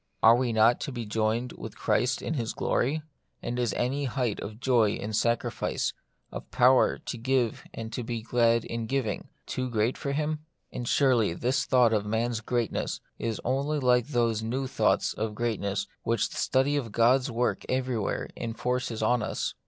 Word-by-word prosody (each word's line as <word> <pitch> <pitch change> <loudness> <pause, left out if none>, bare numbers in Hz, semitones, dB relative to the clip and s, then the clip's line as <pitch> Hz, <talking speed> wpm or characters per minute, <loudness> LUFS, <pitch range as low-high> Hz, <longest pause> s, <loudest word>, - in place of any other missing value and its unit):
Are 115 +1 +8
we 125 -1 0
not 115 +2 +4
to - - -3
be 120 -3 -5
joined 110 +3 0
with - - -8
Christ 125 0 +1
in - - -2
His 120 -7 -2
glory; 150 +5 0 0.4
and 120 +1 -2
is 120 -3 +1
any 135 +4 0
height 125 -4 -1
of 110 +2 -7
joy 120 -5 +3
in 105 +1 -5
sacrifice, 115 +2 0 0.4
of - - -8
power 125 +1 +4
to - - -6
give 125 -1 0
and 115 0 -7
to 125 - -2
be 115 -1 -4
glad 115 0 +2
in 115 -1 -4
giving, 130 -5 -2 0.2
too 130 0 -3
great 115 +1 0
for 140 - -2
Him? 155 +1 -1 0.3
And 120 - -5
surely 120 - +3
this 130 +7 0
thought 125 -3 +4
of 105 -1 0
man's 115 +1 0
greatness 120 0 -1 0.2
is 115 -2 -2
only 140 +4 0
like 125 -2 +3
those 115 -6 +1
new 125 +5 -2
thoughts 130 - +1
of 110 -1 -3
greatness 100 -4 -1 0.2
which 115 -1 0
the - - -8
study 135 +2 +2
of 120 -6 -3
God's 125 +5 +3
works 120 0 -1
everywhere 130 -5 -1
enforces 120 0 -2
on 120 +2 +3
us. - - -2
120 Hz, 175 wpm, -28 LUFS, 110-130 Hz, 0.4 s, Are